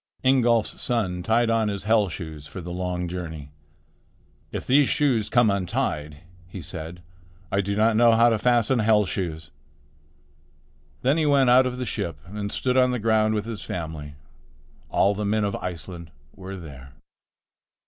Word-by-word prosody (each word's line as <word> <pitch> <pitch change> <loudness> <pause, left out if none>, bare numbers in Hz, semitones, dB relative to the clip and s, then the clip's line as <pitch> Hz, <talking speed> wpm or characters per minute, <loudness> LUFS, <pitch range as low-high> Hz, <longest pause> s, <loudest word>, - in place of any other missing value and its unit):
Ingolf's 120 -4 +2
son 95 -8 -1
tied 115 +5 +2
on 115 -1 +2
his 100 -2 -3
hell 105 -1 +3
shoes 80 -4 -8
for 85 - -8
the 90 0 -7
long 90 0 -3
journey. 80 -5 -6 1.0
"If - - -5
these 135 +1 +4
shoes 125 -8 +1
come 120 -4 +4
untied," 75 -6 -2 0.3
he 95 +2 -9
said, 85 +2 -7 0.5
"I 100 - +2
do 100 +1 -2
not 110 +1 +3
know 115 +1 +5
how 115 +1 +5
to 115 -2 +1
fasten 120 +1 +2
hell 105 -1 +3
shoes." 80 -4 -4 1.5
Then 135 +5 +3
he 155 - +1
went 135 -3 +4
out 130 +1 +6
of 125 0 -4
the 125 - -3
ship 85 - -4
and 100 +2 -5
stood 130 0 0
on 125 0 +5
the 125 - -1
ground 110 -1 +2
with 105 0 -2
his 115 -3 -6
family. 80 -4 -6 0.7
All 100 +2 +3
the 105 +1 -4
men 105 +1 +1
of 100 -1 -1
Iceland 85 -1 -7 0.3
were 95 0 -8
there. 70 -5 -11
105 Hz, 165 wpm, -24 LUFS, 90-115 Hz, 1.5 s, out